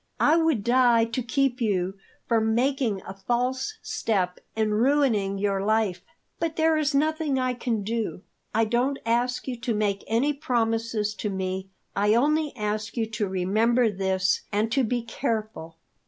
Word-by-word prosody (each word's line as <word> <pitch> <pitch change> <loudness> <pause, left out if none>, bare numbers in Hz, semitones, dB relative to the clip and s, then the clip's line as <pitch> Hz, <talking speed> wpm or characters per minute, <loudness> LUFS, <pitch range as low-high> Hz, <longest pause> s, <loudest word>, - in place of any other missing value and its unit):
I 305 - +5
would 320 -10 +2
die 240 -1 +4
to 230 +3 -3
keep 255 +1 0
you 190 -4 0 0.3
from 220 -1 +2
making 250 -5 0
a 190 - -6
false 250 - -1
step 185 -5 -1 0.2
and 215 -1 +1
ruining 240 -8 +2
your 195 -1 0
life. 210 -4 +1 0.4
But 330 -2 -1
there 320 0 +3
is 300 -2 +1
nothing 310 -1 +1
I 255 -1 0
can 235 -4 -2
do. 220 -2 -3 0.3
I 225 +1 +2
don't 245 +5 +1
ask 240 +3 0
you 255 - -2
to 235 -2 -1
make 205 -2 0
any 250 +7 +2
promises 225 -5 -1
to 210 - -3
me; 190 0 -3 0.3
I 205 +2 +3
only 300 +4 +2
ask 215 0 -3
you 225 - +1
to 215 -1 -1
remember 215 +6 +2
this, 190 -1 0
and 215 +2 0
to 270 +1 +2
be 240 +1 -1
careful. 220 - -4
225 Hz, 160 wpm, -26 LUFS, 205-255 Hz, 0.4 s, I